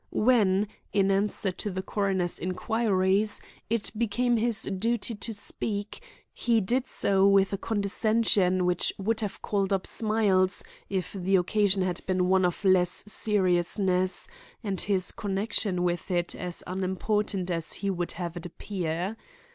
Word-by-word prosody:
When, 210 -4 +3 0.2
in 195 -1 +2
answer 195 0 0
to 205 - -5
the 190 -1 -4
coroner's 195 -3 -1
inquiries, 195 +1 +1 0.3
it 230 -1 -1
became 235 +2 +1
his 230 -1 +1
duty 225 +4 0
to 225 +2 -5
speak, 205 - -4 0.3
he 235 -2 +2
did 245 +6 0
so 195 0 +2
with 195 0 +4
a - - 0
condescension 205 -3 +2
which 180 0 +2
would 220 +3 -1
have 210 -3 -4
called 200 -1 0
up 195 -2 0
smiles 205 -4 +1 0.3
if 185 -2 -3
the 195 0 +1
occasion 195 +1 +2
had 180 -2 -2
been 185 -1 +1
one 190 -1 +4
of 180 +3 -2
less 180 -2 +3
seriousness, 185 - +1 0.4
and 195 -3 -1
his 190 -3 +1
connection 195 -2 -1
with 175 +1 -1
it 175 -1 0
as 180 -1 -4
unimportant 190 +1 -1
as 165 -1 -1
he 200 -1 -2
would 175 -2 -2
have 175 -1 -5
it 175 0 -6
appear. 180 +2 -4
195 Hz, 145 wpm, -27 LUFS, 185-210 Hz, 0.4 s, with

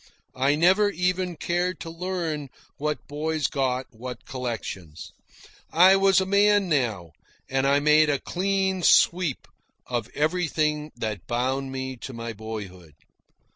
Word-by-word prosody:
I 135 +3 +2
never 190 +6 +4
even 180 -1 -1
cared 175 +3 -1
to 165 - -6
learn 165 -5 -3 0.3
what 150 +1 -3
boys 155 +1 -2
got 130 -2 0
what 125 +2 -8
collections. 110 - -6 0.6
I 185 +4 +7
was 195 -1 +4
a 190 - 0
man 200 0 +3
now, 110 - -1 0.4
and 135 +1 0
I 140 +1 +4
made 150 +1 +5
a 145 - +2
clean 190 +3 -1
sweep 170 -4 +3 0.4
of 120 -2 -3
everything 155 -1 0
that 110 -6 -5
bound 130 +3 -1
me 130 -1 -5
to 130 - -8
my 115 0 -5
boyhood. 100 -7 -8
150 Hz, 135 wpm, -25 LUFS, 125-180 Hz, 0.6 s, I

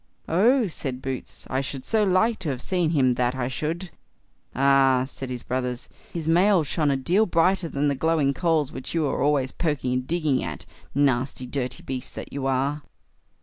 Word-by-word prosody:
"Oh!" 225 +8 +3
said 135 -7 -4
Boots, 130 -1 -6
"I 130 +1 -1
should 135 -1 -6
so 220 -2 +2
like 210 +4 +2
to 175 -5 -3
have 130 -3 -2
seen 175 +2 0
him, 135 -6 +3
that 125 +1 0
I 125 -2 -1
should." 160 +6 -3 0.6
"Ah! 135 -1 +4
"said 135 -1 -7
his 125 -1 -5
brothers, 125 -1 -3 0.2
"his 165 -2 -4
mail 180 +2 +4
shone 150 +1 0
a 140 - +2
deal 185 +11 +2
brighter 170 +1 +2
than 145 0 0
the 140 - +2
glowing 145 0 +1
coals 160 -3 +1
which 130 +5 -6
you 160 -2 +2
are 140 - -1
always 140 -2 +2
poking 145 -7 -1
and 125 0 -2
digging 155 -6 +1
at; 75 -5 -6 0.3
nasty 130 -2 +1
dirty 125 -1 -3
beast 130 -1 -5
that - - -7
you 135 -1 -2
are." 135 +3 0
140 Hz, 190 wpm, -25 LUFS, 130-165 Hz, 0.6 s, Ah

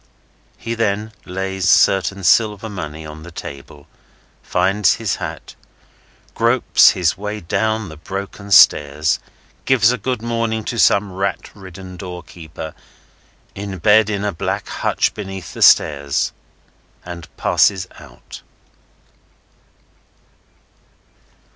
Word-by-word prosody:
He 115 - -4
then 110 -1 -1
lays 95 0 -2
certain 95 +1 +3
silver 105 +3 +3
money 80 -5 -7
on 75 0 -9
the 85 - -10
table, 70 -3 -10 0.6
finds 100 -1 +2
his 115 -4 -2
hat, - - -7 0.8
gropes 115 +2 +4
his 90 0 +1
way 105 +1 -4
down 110 +4 -1
the 80 - -11
broken 100 +4 -7
stairs, 75 -4 +5 0.5
gives 120 -3 +4
a 125 - -2
good 125 -3 -3
morning 115 -1 -1
to 115 - -4
some 100 -2 +3
rat 95 +2 -3
ridden 95 -2 -11
doorkeeper, 85 -3 -9 0.8
in 100 -1 -6
bed 105 +4 +4
in 100 -1 -2
a 105 - 0
black 80 - -3
hutch - - 0
beneath 95 -4 -7
the - - -8
stairs, 70 -3 +4 0.7
and 85 -1 -8
passes 95 -2 +2
out. 65 -5 -13
95 Hz, 110 wpm, -19 LUFS, 85-105 Hz, 0.8 s, stairs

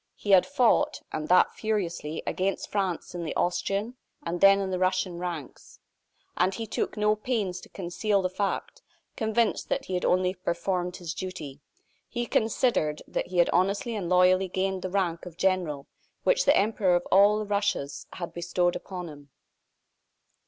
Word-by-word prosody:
He 205 - -3
had 190 -2 +6
fought, 285 +2 +2
and 155 0 -3
that 180 +2 +5
furiously, 175 -8 -3
against 195 +1 -2
France 190 -5 -2
in 175 -1 -4
the 155 - -4
Austrian, 200 +7 -1 0.3
and 170 +1 -3
then 195 0 +7
in 195 -1 -2
the 185 - -1
Russian 185 -1 0
ranks. 170 -6 -7 0.6
And 185 +2 +1
he 225 - -4
took 220 - -3
no 210 0 +3
pains 210 -5 -2
to - - -14
conceal 195 +2 -1
the - - +2
fact; 200 - -3 0.3
convinced 220 +1 0
that - - -1
he 190 - -5
had 180 - -1
only 185 0 +2
performed 180 0 -2
his 170 -3 -5
duty. 150 -7 -7 0.5
He 240 0 -2
considered 220 -10 +1
that - - -3
he 180 0 -5
had 175 - +4
honestly 200 +6 +1
and 185 -5 -3
loyally 185 +1 +4
gained 190 +1 -1
the 185 - -3
rank 180 -3 -1
of 170 -2 -11
general 175 -7 0 0.4
which - - +3
the - - +5
Emperor 200 -3 +2
of 175 - 0
all 200 +2 +6
the 215 - -2
Russias 200 -9 -1
had 175 -2 -6
bestowed 175 0 0
upon 180 -2 -6
him. 145 -2 -12
185 Hz, 170 wpm, -27 LUFS, 175-205 Hz, 0.6 s, then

